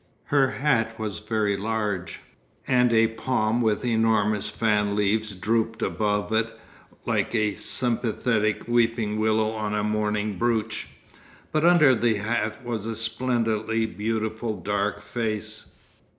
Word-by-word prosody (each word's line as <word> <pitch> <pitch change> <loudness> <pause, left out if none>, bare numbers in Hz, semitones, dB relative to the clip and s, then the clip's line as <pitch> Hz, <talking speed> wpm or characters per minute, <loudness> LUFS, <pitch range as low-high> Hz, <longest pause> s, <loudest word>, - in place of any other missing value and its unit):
Her 135 -2 +5
hat 115 -6 0
was 110 -3 -4
very 105 -1 0
large, 105 -3 -3 0.4
and 125 -1 +3
a 115 -1 +5
palm 115 0 0
with 110 +1 +1
enormous 110 -3 +2
fan 105 -2 +1
leaves 105 0 0
drooped 110 +4 0
above 105 -1 -1
it 110 +1 +1 0.6
like - - 0
a 105 -2 +1
sympathetic 115 -2 0
weeping 115 -3 +1
willow 110 0 +2
on 110 -1 -3
a 105 - 0
mourning 105 -1 -1
brooch. 115 -2 -1 0.6
But 155 +1 +1
under 160 -6 +6
the 115 -1 +2
hat 110 +2 -2
was 115 -3 -3
a 115 - -3
splendidly 115 -1 0
beautiful 110 +1 -3
dark 105 0 -1
face. 110 -2 -4
110 Hz, 125 wpm, -25 LUFS, 105-115 Hz, 0.6 s, under